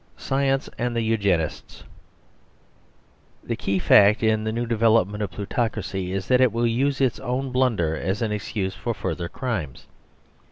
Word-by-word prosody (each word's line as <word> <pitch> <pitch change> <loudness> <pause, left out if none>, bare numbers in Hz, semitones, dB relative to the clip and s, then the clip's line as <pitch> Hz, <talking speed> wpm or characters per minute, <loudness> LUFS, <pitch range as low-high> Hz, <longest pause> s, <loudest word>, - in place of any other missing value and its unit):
SCIENCE 135 0 0
AND 120 0 -1
THE 115 - 0
EUGENISTS 100 -8 -1 1.6
The - - -3
key 100 - -1
fact 105 +4 +5
in 110 -1 +2
the 110 - -1
new 120 +2 -2
development 110 -3 +2
of 105 - -2
plutocracy 95 -1 -3
is 95 0 -3
that 125 0 +4
it 130 -3 +4
will 115 +2 0
use 135 +4 +1
its 130 -4 +1
own 130 +1 -3
blunder 115 -11 +1
as 95 +8 -2
an 110 - -1
excuse 100 -2 -3
for 110 +4 -4
further 85 -3 -4
crimes. 105 - -4
110 Hz, 155 wpm, -24 LUFS, 95-120 Hz, 1.6 s, fact